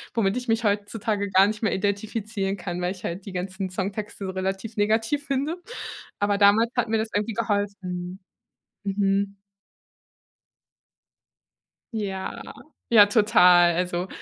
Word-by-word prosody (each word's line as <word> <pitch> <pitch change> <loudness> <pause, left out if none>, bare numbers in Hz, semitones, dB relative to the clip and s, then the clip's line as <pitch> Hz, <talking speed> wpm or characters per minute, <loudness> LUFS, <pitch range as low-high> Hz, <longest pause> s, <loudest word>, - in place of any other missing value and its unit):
womit 200 -2 +1
ich 250 0 -5
mich 225 +1 +1
heutzutage 205 0 -1
gar 190 +1 +6
nicht 215 +2 -3
mehr 220 - +2
identifizieren 200 0 -2
kann, 175 0 -5
weil 180 - 0
ich 185 -1 -9
halt 180 +3 -4
die 195 - -8
ganzen 190 +1 -4
Songtexte 195 +2 -4
so 190 - -3
relativ 195 +4 -4
negativ 225 +7 +1
finde. 280 +5 -1 0.6
Aber 205 0 +1
damals 215 +4 +5
hat 245 -2 0
mir 225 - +2
das 220 - -2
irgendwie 210 +2 -1
geholfen. 200 -4 -3 0.7
Mhm. 200 0 0 2.6
Ja. 195 -3 -4 0.5
Ja, 210 -3 +8
total. 180 -5 +5
Also, 180 0 -1
200 Hz, 130 wpm, -25 LUFS, 190-220 Hz, 2.6 s, Ja